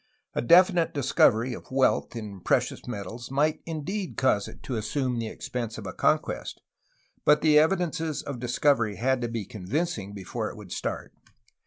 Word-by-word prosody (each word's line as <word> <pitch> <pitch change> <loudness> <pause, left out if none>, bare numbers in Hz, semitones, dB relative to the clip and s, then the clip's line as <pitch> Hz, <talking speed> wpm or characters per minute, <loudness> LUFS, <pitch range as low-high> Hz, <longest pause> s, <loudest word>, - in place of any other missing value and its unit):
A - - 0
definite 175 +4 +5
discovery 125 -3 +3
of - - -10
wealth 130 -2 +1
in 105 -4 -6
precious - - 0
metals 115 +1 -6
might 150 +3 +1
indeed 175 +5 -4
cause 105 -6 +2
it - - -12
to 130 - -5
assimie 120 +3 -1
the 115 - -2
expense 115 0 -5
of 110 - -7
a 95 - -5
conquest, - - 0 0.6
but 150 0 +5
the 150 -1 +6
evidences 165 -2 0
of 140 -4 -5
discovery 120 -3 +2
had 130 +5 +1
to 120 - -1
be 115 -3 -4
convincing 105 - -3
before 105 +3 -4
it - - -10
would 100 -4 -11
start. - - -4
125 Hz, 165 wpm, -27 LUFS, 110-150 Hz, 0.6 s, the